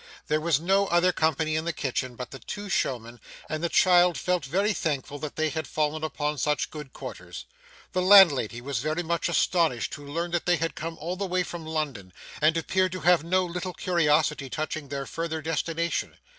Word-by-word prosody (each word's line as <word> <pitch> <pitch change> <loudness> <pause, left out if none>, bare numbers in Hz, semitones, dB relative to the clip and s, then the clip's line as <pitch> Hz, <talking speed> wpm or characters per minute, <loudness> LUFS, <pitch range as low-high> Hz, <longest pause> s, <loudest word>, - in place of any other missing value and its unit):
There 155 +1 +2
was 160 -3 +2
no 195 +4 +2
other 175 +1 +3
company 155 -1 0
in 155 +1 -1
the 170 - 0
kitchen 130 -3 -3
but 125 0 -7
the 135 - -8
two 205 +7 -7
showmen, 120 -8 -2 0.3
and 155 +1 -4
the 170 - +1
child 180 -1 +5
felt 180 -3 0
very 195 +10 +1
thankful 145 -4 -3
that 150 -1 -6
they 155 0 +1
had 160 0 -4
fallen 155 0 -1
upon 150 -1 -2
such 150 -3 0
good 150 -4 -8
quarters. - - -8 0.5
The 185 - 0
landlady 170 - +6
was 135 -2 -3
very 155 +6 -1
much 170 +1 -1
astonished 165 -7 +1
to 145 - -7
learn 165 +5 -3
that 175 0 -1
they 175 -1 +4
had 165 0 -2
come 165 +1 -6
all 175 +3 -4
the 200 0 -2
way 180 0 +1
from 170 -2 -7
London, 140 - -4 0.3
and 155 +2 +4
appeared 185 +2 +1
to 185 - -5
have 175 -2 +4
no 185 +2 +1
little 180 +1 -4
curiosity 150 -5 +1
touching 155 +1 -4
their 140 0 -4
farther 165 +1 -3
destination. 165 +2 -2
160 Hz, 200 wpm, -26 LUFS, 150-175 Hz, 0.5 s, landlady